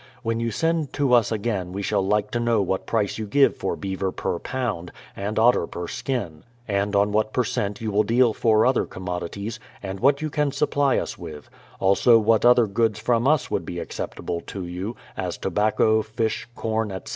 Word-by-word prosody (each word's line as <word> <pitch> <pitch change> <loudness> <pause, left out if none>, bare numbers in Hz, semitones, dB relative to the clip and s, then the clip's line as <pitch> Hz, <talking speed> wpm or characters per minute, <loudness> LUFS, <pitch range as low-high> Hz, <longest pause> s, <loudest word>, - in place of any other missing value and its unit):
When 115 0 -1
you 115 0 -1
send 165 +5 -1
to 140 -3 +1
us 120 -2 +4
again 100 -5 -2
we 100 +1 -4
shall 95 - +1
like 105 +2 0
to 120 - -1
know 120 -2 +2
what 95 -1 -1
price 110 -2 0
you 110 - -4
give 140 +7 +4
for - - -2
beaver 95 -1 -3
per 85 - -3
pound, 120 -10 -3 0.2
and 100 +2 -4
otter 115 -6 +4
per 85 0 -6
skin; 95 - -3 0.3
and 100 0 0
on 100 +1 +3
what 110 +1 0
per 125 - +2
cent 100 -2 -2
j'ou 110 - -3
will 105 +1 +3
deal 120 +1 +3
for 110 -1 +3
other 130 0 +2
commodities, 95 +4 -5 0.2
and 95 0 -5
what 140 +2 +3
you 155 0 -3
can 150 -2 +1
supply 140 -1 +1
us - - -3
with; 75 -1 -9 0.3
also 100 +5 +5
what 110 0 +3
other 120 -1 +6
goods 110 +1 0
from 115 +2 +1
us 155 0 +2
would 95 - 0
be 85 +2 -6
acceptable 85 0 -4
to 95 -3 -5
you, 90 +6 -5 0.2
as - - -3
tobacco, 110 +1 +2
fish, 110 +1 -2
corn, 110 -1 -1
etc. 95 -1 -7
110 Hz, 200 wpm, -24 LUFS, 100-120 Hz, 0.3 s, other